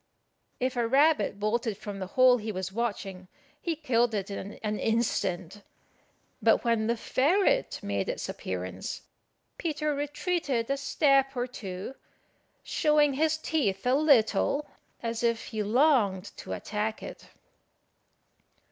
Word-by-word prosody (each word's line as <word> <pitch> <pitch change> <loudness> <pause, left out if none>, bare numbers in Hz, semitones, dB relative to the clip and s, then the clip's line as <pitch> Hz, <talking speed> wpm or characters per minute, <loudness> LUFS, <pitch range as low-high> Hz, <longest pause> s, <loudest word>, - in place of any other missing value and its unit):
If 255 +1 -1
a 240 -1 +1
rabbit 270 -6 +3
bolted 215 0 -1
from 205 -2 -7
the 185 - -4
hole 255 -1 +7
he 220 -1 -4
was 190 -1 -4
watching, 195 -4 -3 0.3
he 335 -2 -1
killed 240 -6 +1
it 200 -1 -3
in 200 +1 -6
an 210 -1 -1
instant; 200 -4 -1 0.8
but - - +4
when 230 -2 +2
the 235 0 +1
ferret 380 - +2
made 100 -1 -2
its - - -3
appearance, 95 - -5 0.6
Peter 305 -2 -1
retreated 290 -3 -1
a 275 - +1
step 275 -1 +2
or 245 - +1
two, 200 -3 -7 0.7
showing 300 -2 +3
his 315 +3 +1
teeth 250 -12 -1
a 250 - +3
little 280 -1 +3 0.4
as 230 0 -2
if 230 -1 0
he 220 -2 -3
longed 210 -5 +2
to - - -8
attack 215 +1 -3
it. - - -9
235 Hz, 130 wpm, -28 LUFS, 205-280 Hz, 0.8 s, hole